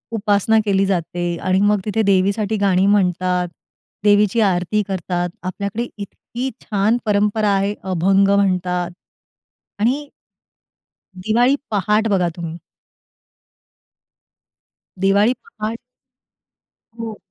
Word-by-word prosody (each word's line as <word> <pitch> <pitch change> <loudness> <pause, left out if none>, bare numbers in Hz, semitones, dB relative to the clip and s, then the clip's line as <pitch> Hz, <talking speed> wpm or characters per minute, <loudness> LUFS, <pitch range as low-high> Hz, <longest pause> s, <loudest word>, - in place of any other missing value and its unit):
उपासना 210 +1 +2
केली 195 -1 +2
जाते 175 -2 -2 0.2
आणि 185 0 +2
मग 205 0 +3
तिथे 220 +1 0
देवीसाठी 200 +2 +1
गाणी 195 -2 +2
म्हणतात. 180 -2 +1 0.6
देवीची 205 +1 +4
आरती 195 +1 +1
करतात. 180 -2 -2
आपल्याकडे 200 +5 -3
इतकी 240 +5 -6
छान 210 +2 +1
परंपरा 210 0 +1
आहे. 195 +1 0
अभंग 190 +2 +2
म्हणतात 180 -3 +1 0.9
आणि 265 +7 0 1.2
दिवाळी 240 +5 +3 0.2
पहाट 210 +2 +1
बघा 185 -4 +2
तुम्ही. 170 -1 -6 2.5
दिवाळी 200 +5 +4
पहाट 225 - -5 1.2
हो. 225 -2 -5
200 Hz, 95 wpm, -20 LUFS, 185-215 Hz, 2.5 s, देवीची